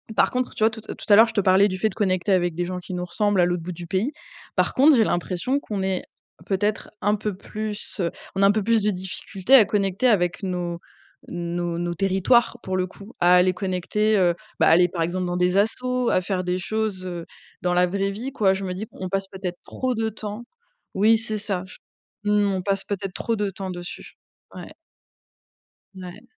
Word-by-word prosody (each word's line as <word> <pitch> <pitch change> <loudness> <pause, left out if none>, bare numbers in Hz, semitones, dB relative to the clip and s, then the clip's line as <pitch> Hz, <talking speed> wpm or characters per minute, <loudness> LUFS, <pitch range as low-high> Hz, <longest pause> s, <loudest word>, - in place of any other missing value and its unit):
par - - +3
contre, 250 0 -2
tu - - -1
vois? 220 - +6
Tout 220 - -8
à - - -4
tout - - -11
à - - +10
l'heure, 225 +2 +8
je 225 - -7
te 205 - +2
parlais 190 +1 +5
du 185 - -3
fait 220 - +2
de 190 - -10
connecter 185 -1 0
avec 175 -2 +1
des 175 - -1
gens 180 +1 -4
qui 180 +1 -8
nous 180 0 -2
ressemblent 205 +1 +1
à 175 - +5
l'autre 175 -1 -1
bout 180 +1 -5
du 175 +1 -8
pays. 200 - 0 0.4
Par - - +1
contre, 285 +2 +6
j'ai 225 - +5
l'impression 185 +11 -1
qu'on 205 -7 -4
est 190 -1 -1 0.4
peut-être 205 +2 -1
un 205 0 +2
peu 210 -2 -3
plus 215 +2 -5
heu, 170 - 0 0.2
on 195 - 0
a 195 - +7
un - - +6
peu 215 -1 0
plus 230 +2 +3
de 210 +1 +2
difficulté 190 +5 0
à 235 -6 +8
connecter 200 +3 +1
avec 175 -6 +2
nos 175 -2 -3 0.5
nos 175 0 -3
nos 175 0 -2
territoires, 195 +6 +2
pour 185 0 -2
le 185 0 0
coup, 200 +5 -13
à 175 +1 +6
aller 185 +1 +4
connecter, 195 +3 0
heu, 175 -3 +3 0.2
bah, - - +5
aller, 175 +2 +6
par 170 -1 -4
exemple, 180 +2 -2
dans 175 - -2
des 180 +2 +2
assos, 250 +4 +1
à 185 - +2
faire 185 0 -2
des 180 0 0
choses, 215 -2 -2
heu, 175 -2 -5 0.4
dans 180 0 +1
la 180 0 +4
vraie 195 +2 -1
vie, 235 +7 -5
quoi. 195 -6 +3
Je 195 - -5
me 185 - -3
dis: 205 +4 -5
«On 185 -1 -6
passe 195 0 -1
peut-être 185 -2 -5
trop 255 -2 -2
de 225 0 0
temps» 215 +1 -7 0.5
oui, 220 +3 +5
c'est 220 -1 -3
ça 195 -3 -2
je - - -13 0.5
t 205 - -1
mmh. 205 -1 +3
On 185 - -1
passe 195 0 -1
peut-être 195 -2 -4
trop 230 +4 -1
de 205 -1 0
temps 190 0 -6
dessus. 175 0 -8 0.4
Ouais. - - -9 1.3
Ouais. 185 +5 -9
195 Hz, 230 wpm, -24 LUFS, 180-215 Hz, 1.3 s, à